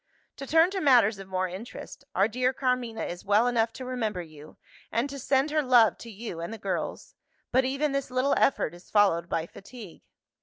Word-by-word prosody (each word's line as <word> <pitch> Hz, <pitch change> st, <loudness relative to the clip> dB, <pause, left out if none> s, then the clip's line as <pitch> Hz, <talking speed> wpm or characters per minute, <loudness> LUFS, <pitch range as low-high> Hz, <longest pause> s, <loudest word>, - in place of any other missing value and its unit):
To 275 Hz, -, -7 dB
turn 325 Hz, +5 st, +4 dB
to 390 Hz, -, -2 dB
matters 235 Hz, -8 st, +4 dB
of 195 Hz, -, -9 dB
more 185 Hz, 0 st, -1 dB
interest 220 Hz, +8 st, -9 dB
our 195 Hz, +3 st, +4 dB
dear 250 Hz, +3 st, 0 dB
Carmina 250 Hz, -3 st, -1 dB
is 175 Hz, 0 st, -6 dB
well 205 Hz, +3 st, +3 dB
enough 230 Hz, -2 st, +1 dB
to 260 Hz, -, -8 dB
remember 220 Hz, -8 st, -3 dB
you, 155 Hz, -2 st, -14 dB, 0.3 s
and 235 Hz, +4 st, 0 dB
to 280 Hz, -, -7 dB
send 270 Hz, +2 st, +1 dB
her 305 Hz, 0 st, +2 dB
love 245 Hz, -5 st, +4 dB
to 235 Hz, -, -10 dB
you 215 Hz, -5 st, -7 dB
and 170 Hz, +4 st, -5 dB
the 225 Hz, -, -6 dB
girls. 195 Hz, -3 st, -4 dB, 0.4 s
But 260 Hz, 0 st, +3 dB
even 275 Hz, +3 st, 0 dB
this 275 Hz, -1 st, -2 dB
little 255 Hz, +2 st, +1 dB
effort 175 Hz, -, +1 dB
is 175 Hz, +1 st, -15 dB
followed 175 Hz, -5 st, +3 dB
by 165 Hz, -1 st, -1 dB
fatigue. 200 Hz, 0 st, -12 dB
230 Hz, 200 wpm, -27 LUFS, 195-260 Hz, 0.4 s, turn